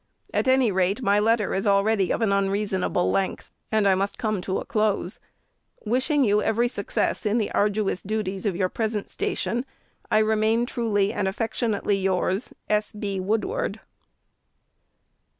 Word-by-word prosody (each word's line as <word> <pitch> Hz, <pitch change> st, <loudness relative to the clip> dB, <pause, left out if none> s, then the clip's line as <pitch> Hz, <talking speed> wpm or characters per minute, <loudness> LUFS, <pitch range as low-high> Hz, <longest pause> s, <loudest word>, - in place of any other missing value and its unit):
At -, -, 0 dB
any 260 Hz, -3 st, +4 dB
rate, 190 Hz, +5 st, 0 dB
my 205 Hz, -1 st, +3 dB
letter 220 Hz, 0 st, +2 dB
is 195 Hz, +2 st, -1 dB
already 200 Hz, -1 st, +3 dB
of -, -, 0 dB
an 210 Hz, -, +2 dB
unreasonable 195 Hz, -2 st, 0 dB
length, 195 Hz, -1 st, -2 dB, 0.2 s
and 215 Hz, -2 st, +3 dB
I 195 Hz, -, +5 dB
must 195 Hz, +1 st, -1 dB
come 215 Hz, -5 st, -1 dB
to 190 Hz, +1 st, -2 dB
a -, -, -4 dB
close. 215 Hz, -4 st, -1 dB, 0.7 s
Wishing 260 Hz, +6 st, +2 dB
you 210 Hz, -2 st, +3 dB
every 230 Hz, +3 st, +1 dB
success 200 Hz, -5 st, -1 dB
in 210 Hz, +2 st, +1 dB
the 220 Hz, -, -1 dB
arduous 205 Hz, -2 st, 0 dB
duties 200 Hz, -1 st, -3 dB
of 190 Hz, -, -1 dB
your 185 Hz, 0 st, +1 dB
present 215 Hz, +1 st, -3 dB
station, 370 Hz, -, -1 dB, 0.5 s
I 215 Hz, -, +3 dB
remain 220 Hz, +2 st, +2 dB
truly 220 Hz, -5 st, 0 dB
and 205 Hz, -4 st, -1 dB
afleutionutely 210 Hz, -1 st, -1 dB
yours, 190 Hz, +3 st, 0 dB, 0.2 s
S. 210 Hz, 0 st, 0 dB
B. 205 Hz, -2 st, -3 dB
WOODWARD. 225 Hz, -, -1 dB
210 Hz, 150 wpm, -25 LUFS, 195-225 Hz, 0.7 s, I